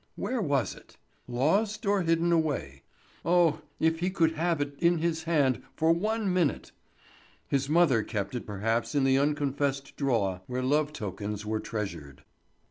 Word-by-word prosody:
Where 255 Hz, -2 st, -2 dB
was 145 Hz, -7 st, 0 dB
it? -, -, -17 dB, 0.3 s
Lost, 200 Hz, -, +1 dB
or 200 Hz, -1 st, +2 dB
hidden 165 Hz, 0 st, +2 dB
away? 145 Hz, -, 0 dB, 0.4 s
Oh, 170 Hz, -3 st, +3 dB, 0.2 s
if 160 Hz, 0 st, +2 dB
he 180 Hz, +2 st, 0 dB
could 170 Hz, -4 st, +2 dB
but 160 Hz, -, -8 dB
have 170 Hz, -2 st, +1 dB
it 145 Hz, 0 st, -2 dB
in 170 Hz, 0 st, +3 dB
his 160 Hz, 0 st, -1 dB
hand 140 Hz, -7 st, +2 dB
for 160 Hz, +1 st, +3 dB
one 210 Hz, +2 st, 0 dB
minute! 175 Hz, -6 st, 0 dB, 0.8 s
His 140 Hz, 0 st, 0 dB
mother 155 Hz, -8 st, +4 dB
kept 100 Hz, -2 st, -4 dB
it 125 Hz, -, -5 dB
perhaps 115 Hz, +6 st, -1 dB
in 140 Hz, -, +3 dB
the 135 Hz, 0 st, +4 dB
unconfessed 140 Hz, -1 st, -1 dB
drawer 105 Hz, -10 st, 0 dB
where 125 Hz, 0 st, -2 dB
love 150 Hz, +3 st, +2 dB
tokens 105 Hz, -4 st, -5 dB
were 110 Hz, 0 st, -1 dB
treasured. 85 Hz, -13 st, -6 dB
145 Hz, 160 wpm, -28 LUFS, 120-170 Hz, 0.8 s, mother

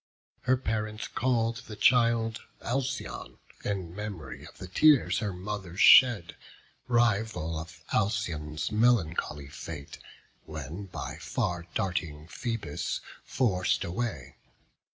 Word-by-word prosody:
Her 130 Hz, 0 st, +4 dB
parents 110 Hz, -3 st, -2 dB
call'd 115 Hz, -2 st, +1 dB
the 105 Hz, -, -7 dB
child 115 Hz, -1 st, +3 dB, 0.2 s
Alcyone, 135 Hz, +2 st, -3 dB, 0.3 s
In 95 Hz, -4 st, -3 dB
mem'ry 105 Hz, -6 st, -6 dB
of -, -, -19 dB
the 95 Hz, -, -8 dB
tears 145 Hz, -, +5 dB
her 105 Hz, -3 st, -1 dB
mother 95 Hz, -1 st, -5 dB
shed, 110 Hz, -7 st, +7 dB, 0.5 s
Rival 110 Hz, -9 st, +1 dB
of 80 Hz, +1 st, -10 dB
Alcyon's 80 Hz, -7 st, -1 dB
melancholy 95 Hz, -, +2 dB
fate, 75 Hz, 0 st, -8 dB, 0.5 s
When 80 Hz, +5 st, -6 dB
by -, -, -6 dB
far 85 Hz, -1 st, -2 dB
darting 80 Hz, -5 st, -2 dB
Phoebus 115 Hz, -, -3 dB, 0.3 s
forc'd 95 Hz, -9 st, +1 dB
away). 85 Hz, -, -4 dB
100 Hz, 105 wpm, -29 LUFS, 85-115 Hz, 0.5 s, shed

